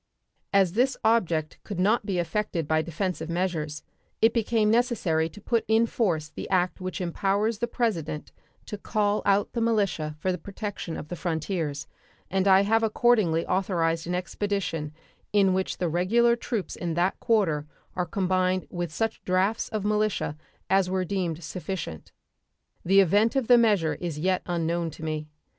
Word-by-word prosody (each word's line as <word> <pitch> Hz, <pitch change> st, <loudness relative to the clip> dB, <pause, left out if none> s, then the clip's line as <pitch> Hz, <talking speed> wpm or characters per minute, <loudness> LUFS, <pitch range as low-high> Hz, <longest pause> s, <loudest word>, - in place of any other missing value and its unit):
As 195 Hz, -3 st, +3 dB
this 255 Hz, +4 st, +2 dB
object 170 Hz, -9 st, +1 dB
could 200 Hz, -4 st, -6 dB
not 210 Hz, +3 st, +2 dB
be 190 Hz, -3 st, -1 dB
effected 175 Hz, -2 st, -1 dB
by 155 Hz, 0 st, +2 dB
defensive 170 Hz, 0 st, -3 dB
measures, 170 Hz, -4 st, -2 dB, 0.4 s
it 225 Hz, +1 st, +4 dB
became 220 Hz, -2 st, +2 dB
necessary 210 Hz, -10 st, +1 dB
to 210 Hz, -, -13 dB
put 230 Hz, +2 st, 0 dB
in 220 Hz, +1 st, +4 dB
force 175 Hz, -10 st, 0 dB
the -, -, -7 dB
act 180 Hz, -1 st, +1 dB
which 185 Hz, 0 st, -4 dB
empowers 200 Hz, +4 st, 0 dB
the 235 Hz, -, 0 dB
President 200 Hz, -11 st, -2 dB, 0.3 s
to 210 Hz, -, -6 dB
call 205 Hz, 0 st, 0 dB
out 200 Hz, 0 st, +2 dB
the 235 Hz, -, -1 dB
militia 200 Hz, -9 st, 0 dB
for 185 Hz, +5 st, -1 dB
the 180 Hz, -, -3 dB
protection 200 Hz, -2 st, -5 dB
of 150 Hz, -, -8 dB
the 175 Hz, -, -4 dB
frontiers, 160 Hz, -3 st, -2 dB, 0.5 s
and 190 Hz, +1 st, +1 dB
I 190 Hz, 0 st, +7 dB
have 225 Hz, +3 st, +2 dB
accordingly 215 Hz, -7 st, +2 dB
authorized 170 Hz, -3 st, 0 dB
an 175 Hz, -, -1 dB
expedition 180 Hz, -5 st, -2 dB, 0.4 s
in 195 Hz, -2 st, +4 dB
which 190 Hz, 0 st, -1 dB
the 180 Hz, -, 0 dB
regular 220 Hz, +9 st, +3 dB
troops 230 Hz, -4 st, -4 dB
in 170 Hz, -2 st, -3 dB
that 175 Hz, +3 st, +1 dB
quarter 175 Hz, -11 st, +1 dB, 0.3 s
are 180 Hz, -1 st, -1 dB
combined 185 Hz, 0 st, 0 dB
with 175 Hz, -2 st, -3 dB
such 225 Hz, +6 st, -2 dB
drafts 185 Hz, +4 st, +1 dB
of 215 Hz, -2 st, -3 dB
militia 210 Hz, -7 st, 0 dB, 0.3 s
as 190 Hz, -1 st, +3 dB
were 185 Hz, 0 st, 0 dB
deemed 175 Hz, -3 st, -2 dB
sufficient. 180 Hz, -, -6 dB, 0.7 s
The 195 Hz, +3 st, +6 dB
event 205 Hz, -, +3 dB
of 265 Hz, -3 st, +1 dB
the 245 Hz, -, +8 dB
measure 205 Hz, -9 st, +3 dB
is 170 Hz, -4 st, -5 dB
yet 185 Hz, +4 st, +1 dB
unknown 170 Hz, -1 st, -1 dB
to -, -, -9 dB
me. 155 Hz, -1 st, -3 dB
185 Hz, 165 wpm, -26 LUFS, 165-210 Hz, 0.7 s, the